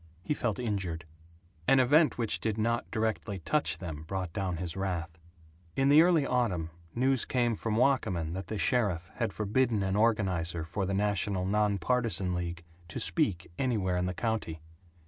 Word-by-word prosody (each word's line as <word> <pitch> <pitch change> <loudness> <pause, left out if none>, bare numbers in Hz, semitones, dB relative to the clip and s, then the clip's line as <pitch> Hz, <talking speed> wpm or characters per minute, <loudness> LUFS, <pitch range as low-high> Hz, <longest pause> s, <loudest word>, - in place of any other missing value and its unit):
He 125 - 0
felt 120 -7 -1
injured. 95 -8 -3 0.6
An 135 - +6
event 145 +5 +4
which 115 -3 0
did 110 -1 -1
not 115 +2 0
directly 110 -2 -2
touch 150 - 0
them 80 -5 -6
brought 95 -2 -3
down 95 -4 -2
his 85 0 -4
wrath. 85 -4 -3 0.6
In 135 +1 +3
the 150 +2 +8
early 165 -4 +4
autumn, 95 -12 0 0.2
news 130 +1 +2
came 120 -3 +1
from 110 0 -2
Wakamin 105 - +1
that 95 +2 -5
the 110 - -3
sheriff 100 -8 0
had 115 -3 0
forbidden 110 +1 +1
an 95 0 0
organizer 95 -7 +1
for 95 +3 -2
the 100 - -1
National 100 -2 0
Nonpartisan 105 0 +1
League 85 -1 -4 0.2
to 85 - -5
speak 85 +1 0
anywhere 105 -9 0
in 90 0 0
the 90 - -3
county. 110 -7 -2
100 Hz, 165 wpm, -30 LUFS, 90-120 Hz, 0.6 s, the